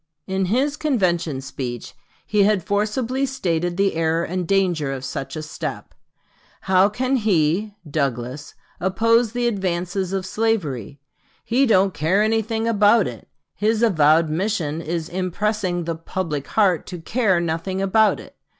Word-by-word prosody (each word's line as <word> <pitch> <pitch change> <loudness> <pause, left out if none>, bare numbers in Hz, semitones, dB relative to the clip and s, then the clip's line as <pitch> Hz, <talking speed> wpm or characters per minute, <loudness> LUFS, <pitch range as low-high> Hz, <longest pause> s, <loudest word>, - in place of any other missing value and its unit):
In 190 0 -1
his 265 +9 0
convention 175 - 0
speech 125 -3 -6 0.3
he 210 -1 +2
had 200 -2 +3
forcibly 225 +7 -1
stated 175 -9 -1
the 195 0 +2
error 165 +1 +1
and 180 0 -3
danger 175 -7 +1
of 135 -1 -5
such 135 +4 -5
a 155 - -5
step. 155 - -6 0.7
"How 190 +1 +4
can 255 +5 0
he 200 -1 +1
[Douglas] 140 -1 -3 0.2
oppose 225 +5 +2
the 245 0 -1
advances 185 -3 -1
of 190 -1 -2
slavery? 165 - -2 0.5
He 260 +4 +2
don't 195 -3 +3
care 165 +7 +2
anything 225 +1 0
about 210 -1 +4
it. 120 -3 -9 0.3
His 220 +2 0
avowed 160 -6 +4
mission 165 -2 -1
is 165 0 -3
impressing 185 0 -1
the 165 0 -2
'public 160 -3 -4
heart' 190 -6 +2
to 180 - -6
care 190 +2 +1
nothing 170 +3 -2
about 210 +3 +3
it.... - - -13
190 Hz, 140 wpm, -22 LUFS, 160-215 Hz, 0.7 s, How